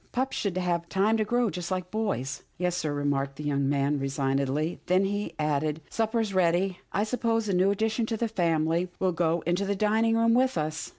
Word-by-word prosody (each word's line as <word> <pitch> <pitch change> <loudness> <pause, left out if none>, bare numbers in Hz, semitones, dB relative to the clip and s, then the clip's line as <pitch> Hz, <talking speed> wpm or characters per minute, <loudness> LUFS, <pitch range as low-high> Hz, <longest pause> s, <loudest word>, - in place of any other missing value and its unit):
Pups 260 +2 -1
should 195 -3 -1
have 170 -2 -1
time 200 +3 +2
to 215 - +2
grow, 240 0 +1
just 170 +1 -5
like 185 -1 -3
boys." 200 - -2
" - - -39
Yes, 180 0 0
sir," 155 -4 -1
remarked 140 -1 -1
the 150 - -7
young 140 -2 0
man 140 +1 +1
resignedly, 135 +3 -1
then 185 +2 +3
he 205 +1 -3
added, 150 0 0
" - - -28
Supper 225 +1 0
is 215 -3 -1
ready. 180 +1 +2
I 205 - +1
suppose 225 0 0
the 200 - -1
new 185 +2 +3
addition 220 +3 0
to 225 - -2
the 235 - 0
family 170 -3 +1
will 185 -1 +1
go 170 -1 +1
into 175 +4 +1
the 200 0 -1
dining 220 +3 +2
room 230 0 +4
with 255 -3 +2
us." 155 0 -2
180 Hz, 220 wpm, -27 LUFS, 155-215 Hz, -, room